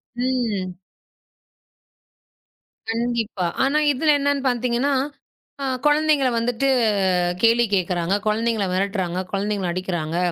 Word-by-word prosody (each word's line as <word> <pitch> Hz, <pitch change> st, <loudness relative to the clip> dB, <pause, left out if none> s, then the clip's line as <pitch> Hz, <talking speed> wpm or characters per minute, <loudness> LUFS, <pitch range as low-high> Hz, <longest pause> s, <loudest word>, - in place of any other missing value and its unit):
ம். 240 Hz, -7 st, -1 dB, 2.2 s
கண்டிப்பா. 230 Hz, -4 st, -2 dB, 0.2 s
ஆனா 275 Hz, +3 st, +2 dB
இதுல 300 Hz, +3 st, +2 dB
என்னன்னு 285 Hz, 0 st, 0 dB
பாத்தீங்கன்னா, 245 Hz, +3 st, 0 dB, 0.7 s
அ -, -, -1 dB, 0.2 s
குழந்தைங்கள 295 Hz, -2 st, +3 dB
வந்துட்டு 245 Hz, +3 st, 0 dB, 0.8 s
கேள்வி 230 Hz, +1 st, +5 dB
கேக்குறாங்க. 180 Hz, 0 st, 0 dB
குழந்தைங்களை 220 Hz, -1 st, 0 dB
மிரட்டுறாங்க. 185 Hz, -2 st, -1 dB
குழந்தைங்களை 200 Hz, -2 st, -1 dB
அடிக்கிறாங்க. 175 Hz, -3 st, -3 dB
230 Hz, 85 wpm, -22 LUFS, 190-255 Hz, 2.2 s, கேள்வி